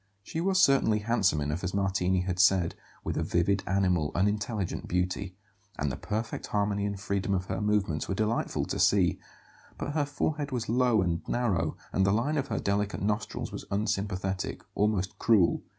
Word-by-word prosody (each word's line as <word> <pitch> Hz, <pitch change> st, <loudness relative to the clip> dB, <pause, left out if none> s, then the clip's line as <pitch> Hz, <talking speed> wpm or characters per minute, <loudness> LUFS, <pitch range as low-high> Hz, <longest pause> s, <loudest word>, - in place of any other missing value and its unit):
She 160 Hz, -, -4 dB
was 190 Hz, +1 st, +2 dB
certainly 135 Hz, -, +4 dB
handsome 105 Hz, -8 st, +1 dB
enough, 75 Hz, +5 st, -2 dB
as 95 Hz, +1 st, -2 dB
Martini 95 Hz, -2 st, +1 dB
had 90 Hz, 0 st, -3 dB
said, 95 Hz, -2 st, +4 dB, 0.3 s
with -, -, -2 dB
a -, -, +1 dB
vivid, 95 Hz, +3 st, +1 dB
animal, 90 Hz, -5 st, +1 dB
unintelligent 105 Hz, 0 st, -1 dB
beauty; 90 Hz, +1 st, -1 dB, 0.4 s
and 70 Hz, -1 st, -1 dB
the -, -, -3 dB
perfect 110 Hz, +9 st, -4 dB
harmony 100 Hz, -1 st, 0 dB
and 100 Hz, -1 st, -4 dB
freedom 100 Hz, 0 st, -1 dB
of 90 Hz, -1 st, -2 dB
her 95 Hz, +1 st, -3 dB
movements 100 Hz, -7 st, 0 dB
were 95 Hz, -, 0 dB
delightful 110 Hz, +3 st, 0 dB
to -, -, -3 dB
see; -, -, +3 dB, 0.6 s
but 145 Hz, -, -3 dB
her 145 Hz, -1 st, +1 dB
forehead 145 Hz, 0 st, -2 dB
was 120 Hz, -3 st, -2 dB
low 120 Hz, -3 st, +3 dB
and 85 Hz, -2 st, -1 dB
narrow, 95 Hz, -10 st, 0 dB, 0.2 s
and 95 Hz, -, +3 dB
the 95 Hz, -, +3 dB
line 120 Hz, +9 st, +1 dB
of 140 Hz, -, -2 dB
her 115 Hz, -5 st, -2 dB
delicate 100 Hz, 0 st, -1 dB
nostrils 105 Hz, 0 st, -2 dB
was -, -, -7 dB
unsympathetic, 100 Hz, -2 st, -2 dB
almost 100 Hz, -2 st, 0 dB
cruel. 105 Hz, -7 st, +4 dB
100 Hz, 175 wpm, -29 LUFS, 95-110 Hz, 0.6 s, certainly